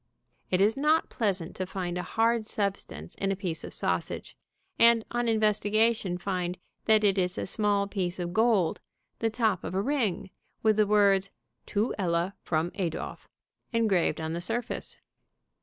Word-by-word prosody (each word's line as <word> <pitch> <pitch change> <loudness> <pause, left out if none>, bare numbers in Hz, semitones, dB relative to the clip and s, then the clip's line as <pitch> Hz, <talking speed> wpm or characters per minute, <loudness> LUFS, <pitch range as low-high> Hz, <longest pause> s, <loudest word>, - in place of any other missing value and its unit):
It 185 0 +2
is 210 +3 +4
not 300 +3 +2
pleasant 195 -7 -1
to 185 - -3
find 180 -2 -4
a 180 - -1
hard 225 +3 +1
substance 200 - -3
in 195 0 -1
a - - 0
piece 175 -4 -3
of - - -7
sausage, - - -2 0.4
and 230 -1 +6
on 240 0 0
investigation 215 -2 +2
find 180 -1 -2 0.3
that 220 -1 +4
it 200 -1 +3
is 180 0 0
a - - -2
small 205 0 +1
piece 190 -3 -2
of 175 -1 -4
gold, 220 -5 +2 0.4
the 225 - +1
top 220 -4 0
of - - -4
a 195 - +2
ring, 210 -9 -1 0.3
with 215 -1 +4
the 215 -1 +4
words 200 -2 +4 0.4
"To 210 +4 0
Ella 175 0 0
from 160 +1 -1
Adolph," 175 -6 -4 0.4
engraved 215 -7 +2
on 160 0 -3
the 170 - -3
surface. 230 +5 -1
200 Hz, 160 wpm, -28 LUFS, 180-220 Hz, 0.4 s, and